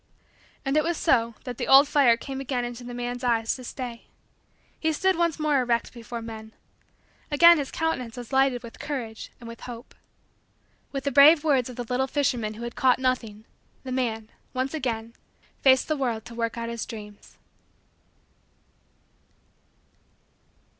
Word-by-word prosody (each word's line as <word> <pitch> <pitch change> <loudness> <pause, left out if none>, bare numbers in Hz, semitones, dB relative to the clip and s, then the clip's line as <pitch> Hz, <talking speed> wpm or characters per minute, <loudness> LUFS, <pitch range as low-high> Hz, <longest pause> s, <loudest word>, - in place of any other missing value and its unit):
And 270 +1 0
it 305 - +4
was 335 0 -1
so 230 -7 +2
that 250 -2 -7
the - - -2
old 275 +2 +8
fire 265 -6 +4
came 270 +2 -6
again 255 -2 -2
into 240 0 -7
the 245 0 -7
man's 245 +1 -4
eyes 230 -2 +1
to 255 - -10
stay. 245 -2 -7 0.7
He 320 0 +1
stood 380 +4 +2
once 335 -2 +1
more 300 -2 +2
erect 235 -1 -1
before 235 -1 -7
men. 220 -1 -9 0.8
Again 335 +2 +7
his 280 - -3
countenance 255 -8 -2
was 245 +2 -8
lighted 265 -2 +2
with 235 - -11
courage 255 -7 -5
and 235 - -11
with 230 0 -9
hope. 235 0 -9 1.0
With 275 -1 -4
the 280 - -1
brave 290 +4 +7
words 270 -6 +2
of 250 - -8
the 245 - -4
little 250 +3 -1
fisherman 245 -6 -1
who 230 - -8
had 235 0 -6
caught 255 -2 +3
nothing, 235 -5 -2 0.4
the 260 - -6
man, 225 -4 -2 0.2
once 260 +2 -1
again, 230 -6 -3 0.5
faced 260 -1 +5
the 310 - 0
world 240 -6 -2
to 235 - -10
work 230 0 -3
out 230 0 -3
his 235 -1 -4
dreams. 210 -2 -11
250 Hz, 165 wpm, -26 LUFS, 230-275 Hz, 1.0 s, old